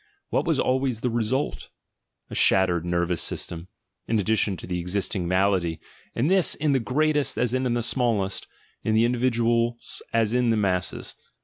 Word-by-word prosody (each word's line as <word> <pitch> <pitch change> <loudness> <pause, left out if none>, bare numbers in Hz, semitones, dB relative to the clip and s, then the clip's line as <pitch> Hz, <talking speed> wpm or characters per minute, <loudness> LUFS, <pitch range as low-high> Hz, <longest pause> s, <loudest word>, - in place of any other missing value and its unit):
What - - 0
was - - +2
always 130 -3 0
the 125 - 0
"result"? 120 +4 -2 0.6
A - - -6
shattered 90 -3 +3
nervous 85 0 0
system, 85 +1 -3 0.4
in 115 - +1
addition 105 -2 +1
to - - -8
the 90 0 -3
existing 90 +1 -2
malady, 90 -3 +1 0.4
and 120 +5 +1
this 190 0 +3
in 150 0 0
the 135 - +3
greatest 145 +5 0
in 125 +1 0
the 120 - 0
smallest, 110 -6 0 0.4
in 110 - +1
the 115 +1 +4
individuals 120 -1 0
as 115 -1 +1
in 120 -3 +2
masses. 90 -3 -1
115 Hz, 150 wpm, -25 LUFS, 95-125 Hz, 0.6 s, the